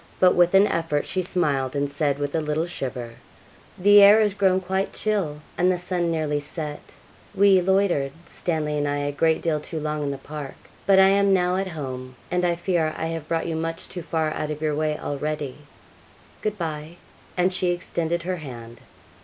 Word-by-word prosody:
But 185 -1 +6
with 175 +1 +4
an 195 +1 +7
effort 165 -6 -1
she 185 - -1
smiled, 145 -8 0
and 140 0 0
said, 145 0 0
with 145 0 -3
a 160 - +1
little 150 +2 -1
shiver, 125 -8 -5 0.7
'The 205 +2 +7
air 205 +2 +8
has 210 -2 +2
grown 190 -2 +2
quite 190 +1 -2
chill, 190 -9 -1 0.2
and 180 +1 +4
the 180 - 0
sun 175 -1 -1
nearly 155 -3 0
set; 150 0 -7 0.4
we 195 -1 +5
loitered, 185 -7 +2
Stanley 155 -4 -2
and 145 - 0
I, 145 0 0
a 145 0 -1
great 160 +2 +1
deal 160 -2 +1
too 160 +2 -5
long 150 0 -2
in 145 - -1
the 140 - -3
park, 145 -1 -8 0.3
but 195 -1 +6
I 190 0 +7
am 200 0 +4
now 180 0 +1
at 195 0 -1
home, 130 -6 -6 0.2
and 180 0 +1
I 175 -1 +2
fear 170 -3 0
I 165 - -2
have 165 -2 -5
brought 165 0 -1
you 165 - -2
much 165 +1 -3
too 180 - -6
far 160 -1 -1
out 155 0 -3
of 150 -1 -4
your 155 -1 0
way 155 0 0
already; 145 -1 -3 0.9
good 215 -1 -2
bye.' 160 -1 -5 0.4
And 180 +1 +2
she 185 -1 0
extended 170 -1 -2
her 180 +1 -2
hand. 120 -6 -10
165 Hz, 200 wpm, -24 LUFS, 150-180 Hz, 0.9 s, air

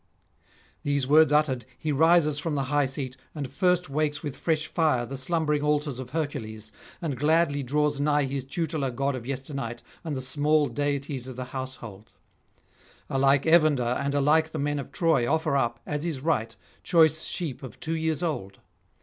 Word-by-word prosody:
These 140 -2 0
words 155 +3 +5
uttered, 150 -5 +2
he 155 - -2
rises 155 0 +4
from 150 +1 -2
the 140 - 0
high 145 -2 +3
seat, 130 -1 -4 0.2
and 145 -3 -3
first 180 +4 +1
wakes 150 +2 -1
with 145 -4 -4
fresh 155 -2 0
fire 150 -8 +1
the 135 +3 -6
slumbering 150 +1 0
altars 150 -3 0
of 130 -1 -6
Hercules, 110 -8 -4 0.3
and 150 -5 -1
gladly 150 -1 +2
draws 145 +2 0
nigh 145 0 +2
his 135 0 -3
tutelar 150 -1 -2
god 135 +3 -1
of 120 -1 -7
yesternight 135 -3 -5 0.2
and 160 -4 -3
the 130 - -3
small 150 +3 +2
deities 140 0 -2
of 130 - -7
the 130 - -4
household. 115 -6 -7 1.0
Alike 135 +1 +3
Evander, 155 -5 +5 0.2
and 140 0 -1
alike 155 +3 +3
the - - -3
men 145 0 -1
of 140 - -7
Troy, 155 -8 +2
offer 160 -3 +1
up, 120 -3 0
as 150 0 -3
is 165 -5 -2
right, 115 -8 0 0.3
choice 160 -2 +4
sheep 155 -8 -3
of 130 -5 -10
two 165 +1 -2
years 160 0 -1
old. 100 - -3
145 Hz, 175 wpm, -27 LUFS, 130-155 Hz, 1.0 s, words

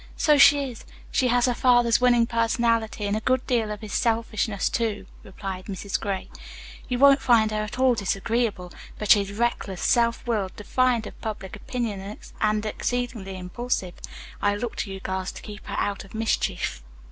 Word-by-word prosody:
"So 300 -2 +4
she 285 0 +7
is. 235 - -12 0.3
She 260 - +2
has 245 0 +3
her 250 - +2
father's 240 -1 +4
winning 240 -2 +5
personality, 230 -2 0
and 200 +1 0
a - - 0
good 255 +2 +1
deal 230 -4 +1
of 210 0 -5
his 215 -2 -7
selfishness, 225 -3 0
too," 210 -4 -1 0.2
replied 190 -1 -7
Mrs. 200 0 -3
Gray. 195 -3 -3 0.6
"You 250 - 0
won't 275 +1 +6
find 225 -3 +4
her 215 0 -1
at 215 +2 -5
all 260 -1 +4
disagreeable. 205 -2 -1 0.2
But 210 - +1
she 205 - +7
is 200 0 -5
reckless, 205 -4 -2
self 235 0 +2
willed, 210 -6 -1
defiant 240 +2 +1
of - - -11
public 210 -3 -5
opinion 210 -3 -4 0.2
and 215 0 +1
exceedingly 225 -4 -3
impulsive. 185 0 -3 0.5
I 205 0 +2
look 225 +2 -4
to 195 - -3
you 195 - -6
girls 190 0 -3
to - - -10
keep 210 0 -10
her - - -4
out 200 -1 -1
of 195 - -13
mischief." 220 - -1
220 Hz, 180 wpm, -25 LUFS, 200-240 Hz, 0.6 s, she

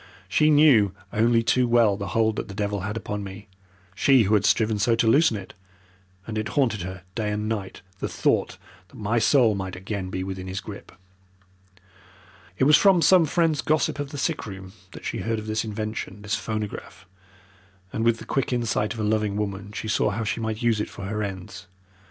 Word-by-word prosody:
She 150 +11 +3
knew 140 -10 +5 0.2
only 115 +1 +3
too 125 +2 +2
well 115 -4 +4
the 100 0 -5
hold 110 +2 +1
that - - -3
the 100 - -9
devil 100 -1 -2
had 105 +4 -4
upon 105 -1 -4
me 100 +2 -9 0.5
she 130 +4 +4
who 105 +1 +1
had 105 -1 +3
striven 110 -1 +2
so 115 +3 +3
to 115 - +1
loosen 115 0 +4
it 100 - -10 0.7
and 110 -1 -3
it 110 - -3
haunted 115 -8 +2
her 95 0 -7
night 110 - -2
and 105 +1 -2
day 100 -4 -3 0.3
the - - -2
thought - - 0 0.3
that - - -20
my 110 +2 0
soul 115 -1 +4
might 95 -2 -4
again 95 0 -5
be 95 0 -3
within 95 -1 -6
his 95 +1 -4
grip. 100 0 -10 1.7
"It - - +1
was 150 +2 +7
from 190 -4 +4
some 185 -3 +6
friend's 160 -1 +1
gossip 155 -1 0
of 145 -1 -3
the 145 - -7
sick 155 -3 -2
room 95 -1 -9 0.2
that - - -10
she - - -3
heard 115 0 -1
of 110 - -6
this 110 0 -1
invention 110 -1 -5
this 105 -1 -3
phonograph 105 -3 -4 0.9
and 110 - -1
with 115 0 +3
the - - -10
quick 135 -3 -1
insight 115 -2 0
of - - -8
a - - -1
loving 105 -1 0
woman 100 -1 -4
she 110 +1 -5
saw 105 - +1
how 110 +3 -2
she 110 +2 -2
might 110 +1 -3
use 115 -3 +2
it - - -4
for 100 - -8
her 105 +2 -3
ends. 95 -1 -6
110 Hz, 205 wpm, -25 LUFS, 100-115 Hz, 1.7 s, was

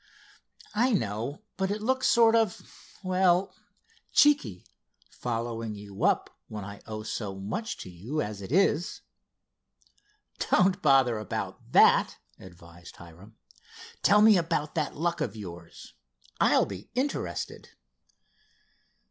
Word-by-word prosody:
"I 240 +4 +2
know, 115 - -2
but 190 0 0
it 205 +1 -2
looks 260 +4 0
sort 230 -1 +5
of—well, 185 -3 0 0.6
cheeky, 125 - +3 0.5
following 115 -2 -4
you 100 -1 -8
up - - +1
when 105 -2 -7
I 100 0 -9
owe 110 -1 -6
so 105 -3 -4
much 110 - -4
to - - -8
you 110 - -5
as 105 -7 -4
it 95 - -8
is." 175 -1 +1 1.5
"Don't 185 0 +3
bother 135 -6 +4
about 105 - -6
that," - - +5 0.2
advised 85 -1 -14
Hiram. 85 +6 -15 0.6
"Tell 210 +1 +5
me 215 -2 +7
about 165 -3 -2
that 155 -4 -2
luck 170 +1 -1
of 150 - -2
yours. 85 -5 -10 0.5
I'll - - +4
be 100 +1 -9
interested." 270 +3 -3
125 Hz, 115 wpm, -28 LUFS, -, 1.5 s, me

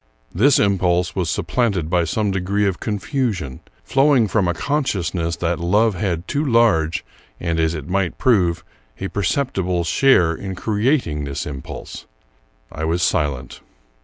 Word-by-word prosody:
This 130 +10 +4
impulse 90 -4 +1
was 90 -3 -1
supplanted 100 -3 0
by 85 0 +1
some 105 +4 0
degree 95 +2 0
of 95 -3 -1
confusion, 105 - -2 0.2
flowing 135 -4 +3
from 100 -2 +1
a 85 - +1
consciousness 90 - -1
that 85 0 -1
love 105 +6 +2
had 90 -2 -2
too 145 0 -1
large, 115 - +2 0.3
and, 85 -1 -1
as 80 0 +1
it 75 -3 -6
might 95 -1 -1
prove, 90 -10 +2 0.4
a 95 - -3
percepti 105 +2 -1
ble, 90 -1 0
share 90 -4 +4
in 95 +3 -6
creating 105 - 0
this 70 -1 -4
impulse. 70 -2 -8 0.6
I 80 - -6
was 85 +2 0
silent. 70 -8 -1
90 Hz, 145 wpm, -20 LUFS, 85-110 Hz, 0.6 s, This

